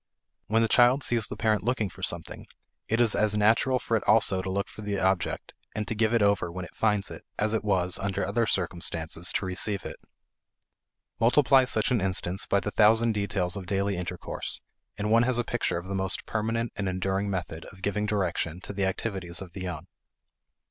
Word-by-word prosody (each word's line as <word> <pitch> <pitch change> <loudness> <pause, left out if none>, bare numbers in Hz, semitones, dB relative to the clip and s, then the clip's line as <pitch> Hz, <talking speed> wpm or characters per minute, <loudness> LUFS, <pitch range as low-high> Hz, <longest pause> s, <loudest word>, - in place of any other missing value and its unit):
When 115 +1 +3
the - - +3
child 125 +4 +4
sees 115 -3 +2
the - - -7
parent 110 -1 +1
looking 120 -2 0
for 95 0 -13
something, 85 -3 -5 0.4
it 115 - 0
is 120 -3 +4
as 105 0 +1
natural 115 +5 +3
for 115 - -1
it 110 - 0
also 100 -4 +4
to 95 - -5
look 100 +1 -1
for - - -11
the 100 -1 -2
object 95 -2 -1 0.2
and 105 -1 -3
to - - -1
give 110 0 +1
it 115 -3 +3
over 100 -4 +2
when 90 +1 -5
it - - -14
finds 105 -3 0
it, - - -9
as 105 +1 0
it 110 - 0
was, 95 -3 +1
under 100 -1 -1
other 110 +4 0
circumstances, 85 -2 -1
to 100 - -1
receive 95 +1 -1
it. - - -6 1.2
Multiply 130 +3 +5
such 110 -3 +1
an 120 -4 +2
instance 95 0 +1
by 100 - +3
the 105 - -4
thousand 115 +2 +4
details 100 -3 -1
of 95 -3 -7
daily 100 +2 0
intercourse, 90 0 -4 0.4
and 105 +1 -2
one 115 +1 +6
has 125 0 +2
a 120 - +1
picture 120 -6 -1
of 85 +2 -6
the 100 - -4
most 95 -1 -1
permanent 115 +1 -2
and 100 -2 -2
enduring 95 +2 -1
method 85 -4 -4
of 95 -3 -14
giving 105 +1 -1
direction 90 -5 -1
to 100 - -7
the 100 -1 0
activities 95 -3 -3
of 90 -3 -10
the 95 - -7
young. 90 -5 -5
100 Hz, 205 wpm, -27 LUFS, 95-110 Hz, 1.2 s, one